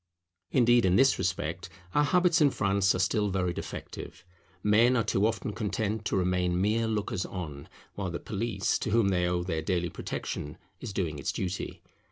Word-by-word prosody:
Indeed 120 -2 +4
in 90 -1 +3
this 135 +5 +4
respect 90 0 -2 0.2
our 145 - +4
habits 180 0 +3
in 145 - +6
France 100 -5 +2
are - - 0
still 100 +3 +1
very 90 -2 0
defective; - - -7 0.4
men 115 +5 +4
are 115 - +2
too 105 0 +2
often 105 -1 -3
content 105 +1 -2
to - - 0
remain 90 -1 +1
mere 110 +4 +1
lookers 105 -4 -1
on, 75 -7 -7 0.2
while 95 -2 -3
the 85 - -4
police 100 -2 -1
to - - -2
whom 110 -2 +3
they 90 -2 +1
owe 90 0 0
their 80 -3 -2
daily 85 +1 -1
protection 75 - -5 0.2
is - - -6
doing 85 -7 -2
its - - -1
duty. 95 0 -4
95 Hz, 180 wpm, -29 LUFS, 90-110 Hz, 0.4 s, in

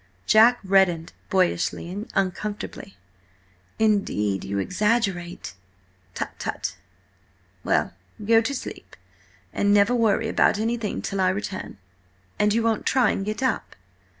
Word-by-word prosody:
Jack 230 +3 +6
reddened 190 -4 +2 0.2
boyishly 180 -3 0
and 200 +5 -6
uncomfortably. 195 +1 -3 0.8
"Indeed, 195 - +1
you 100 +1 -3
exaggerate—" 180 - -1 0.6
"Tut, - - -3
tut! - - -4 0.9
Well, - - +1 0.3
go 225 +1 +5
to 280 +5 -2
sleep, - - -8 0.6
and 205 - +1
never 205 +3 +4
worry 225 -2 +2
about 220 - +3
anything 225 -1 -2
till 195 -1 -2
I 185 - +3
return. 190 0 -4 0.6
And 210 0 +3
you 225 +2 +1
won't 225 -2 0
try 260 -2 +3
and 195 - -2
get 215 +5 -3
up?" 255 -5 -1
205 Hz, 125 wpm, -24 LUFS, 185-225 Hz, 0.9 s, Jack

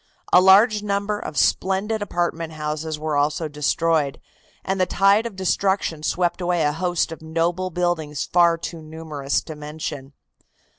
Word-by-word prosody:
A 180 - +8
large 205 +3 +6
number 205 0 -1
of 155 - -7
splendid 200 +3 +1
apartment 170 -4 -2
houses 155 0 -4
were 155 0 -2
also 150 +3 0
destroyed, 150 0 0 0.5
and 190 0 -1
the 185 - +2
tide 200 +5 +3
of 220 - -10
destruction 190 -3 0
swept 175 +3 0
away 175 -2 +1
a 150 - +2
host 175 +1 -1
of 165 - -8
noble 170 +3 -1
buildings 165 -5 -1
far 170 -1 +3
too 165 0 -7
numerous 155 -3 -3
to 155 - -8
mention. 150 -2 -7
165 Hz, 150 wpm, -22 LUFS, 155-190 Hz, 0.5 s, A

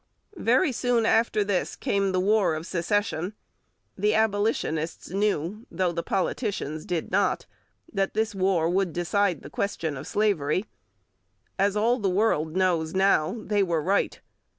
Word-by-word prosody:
Very 255 +5 +3
soon 245 -2 +1
after 225 -2 +3
this 200 -3 -1
came 195 -1 0
the 185 - +1
War 200 -3 +2
of 155 +1 -5
Secession. 185 +1 -1 0.6
The 210 +2 +1
Abolitionists 205 -8 0
knew, 200 +1 -1
though 185 -2 0
the 170 0 -2
politicians 185 - -2
did 175 -3 -2
not, 195 +1 +1 0.5
that 195 -1 -1
this 220 0 0
war 185 -4 +1
would 180 -1 0
decide 180 0 0
the - - -9
question 165 -6 -2
of - - -7
slavery. 195 -4 +1 0.9
As 200 +1 +2
all 235 +4 +2
the 200 -3 +1
world 180 -5 +1
knows 175 -3 +1
now, 195 +2 +2
they 205 -1 +1
were 170 -4 +1
right. 195 +5 0
195 Hz, 145 wpm, -26 LUFS, 170-210 Hz, 0.9 s, Very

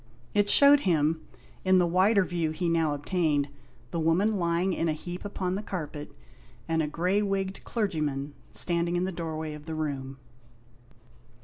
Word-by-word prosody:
It 205 -1 +3
showed 285 +4 +7
him, 160 - +1 0.4
in 185 0 +4
the 180 - +4
wider 190 +3 +3
view 170 -3 -1
he 170 +3 -2
now 165 -3 +2
obtained, 145 -2 0 0.4
the 170 - -2
woman 185 +6 +2
lying 170 +2 +1
in 165 -1 0
a - - +1
heap 175 +3 -7
upon 190 -3 -3
the 195 - -2
carpet, 155 -7 -6 0.6
and 160 0 +1
a 150 - 0
grey 180 +6 +1
wigged 195 -1 -2
clergyman 150 - -2 0.2
standing 170 0 0
in 175 - +1
the 190 - -2
doorway 160 -3 -4
of 150 +1 -11
the 160 - -4
room. 135 -4 -4
170 Hz, 165 wpm, -28 LUFS, 155-190 Hz, 0.6 s, showed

